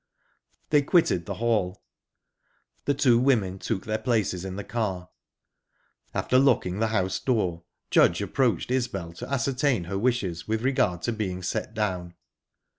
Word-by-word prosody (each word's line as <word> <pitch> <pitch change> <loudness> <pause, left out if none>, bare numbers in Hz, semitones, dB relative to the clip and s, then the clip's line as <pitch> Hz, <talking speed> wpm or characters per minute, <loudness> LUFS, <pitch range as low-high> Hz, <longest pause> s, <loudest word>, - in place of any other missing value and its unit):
They 150 -1 +5
quitted 140 - +2
the - - -3
hall. 105 -5 0 1.0
The 145 - +1
two 125 -4 +4
women 110 -8 +2
took 100 -1 -3
their 110 0 -1
places 110 -7 0
in 95 -1 -5
the 100 - -5
car. 100 -5 -3 1.0
After 130 - +2
locking 105 -8 +2
the 110 - +2
house 95 -3 0
door, 90 -9 -1 0.3
Judge - - +5
approached 125 -2 0
Isbel 100 -10 -2
to 85 - -8
ascertain 135 -4 +1
her 95 +3 -3
wishes 100 -8 -1
with 110 +1 -1
regard 110 -10 +1
to 120 - 0
being 95 -4 -3
set 100 +5 -3
down. 90 -5 -2
110 Hz, 145 wpm, -26 LUFS, 90-125 Hz, 1.0 s, They